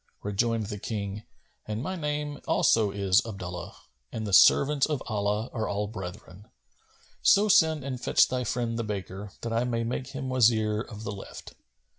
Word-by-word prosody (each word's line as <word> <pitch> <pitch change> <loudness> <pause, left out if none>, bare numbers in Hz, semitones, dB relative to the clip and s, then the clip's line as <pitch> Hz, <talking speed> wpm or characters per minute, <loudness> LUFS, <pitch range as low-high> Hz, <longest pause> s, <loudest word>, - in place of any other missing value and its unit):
Rejoined 110 +2 0
the 105 0 -6
King, 105 -1 -5 0.4
"And 110 +2 -3
my 185 - -3
name 150 -3 -3
also 110 -2 +3
is 100 -1 +2
Abdullah; 90 -4 -7 0.4
and 110 - -4
the 100 - -4
servants 140 +7 +6
of 150 -4 -2
Allah[FN#253] 105 +1 -1
are 110 -3 -2
all 100 +1 -1
brethren. 95 -1 -9 0.7
So 205 +2 +5
send 160 -8 +4
and 130 -2 -5
fetch - - +4
thy 125 0 -2
friend 120 0 -2
the - - -1
baker, 100 -1 -5
that 115 -1 -3
I 115 +1 +1
may 115 -2 -1
make 125 +2 -3
him 135 -1 -5
my 130 - -2
Wazir 110 -3 +3
of 110 -2 -9
the 100 - -4
left." 100 -1 -9
110 Hz, 175 wpm, -27 LUFS, 100-130 Hz, 0.7 s, servants